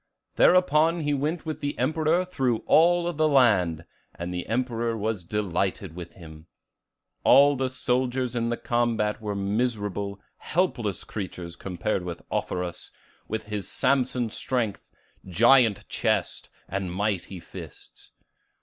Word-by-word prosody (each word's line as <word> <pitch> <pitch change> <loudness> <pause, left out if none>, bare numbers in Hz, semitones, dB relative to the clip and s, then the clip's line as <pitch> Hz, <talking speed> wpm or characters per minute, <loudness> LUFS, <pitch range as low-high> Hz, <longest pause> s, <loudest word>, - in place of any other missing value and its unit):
Thereupon 165 -2 +4
he 145 -1 0
went 150 +5 -2
with 155 -1 -4
the 145 0 -3
Emperor 160 +3 +1
through 130 -10 -1
all 175 +1 +4
the 155 0 +2
land, 95 - +3 0.3
and 85 +1 -5
the 90 -1 -4
Emperor 115 -1 -1
was 110 -3 -2
delighted 95 -2 -2
with 85 -1 -8
him. 80 -2 -13 0.8
All 140 +2 +6
the 130 -1 -1
soldiers 125 0 -1
in 115 -1 0
the 120 - -1
combat 115 -3 0
were 105 -2 -3
miserable, 100 -1 -2 0.2
helpless 120 - -1
creatures 90 -4 -6
compared 95 +1 -2
with 85 -1 -6
Offerus, 90 -1 -3 0.4
with 110 +1 -3
his 105 -2 -4
Samson 125 -4 +1
strength, 115 -5 -2 0.4
giant 115 +3 +4
chest, - - -1 0.2
and 95 -2 -3
mighty 95 -1 -2
fists. - - -12
115 Hz, 125 wpm, -26 LUFS, 95-135 Hz, 0.8 s, All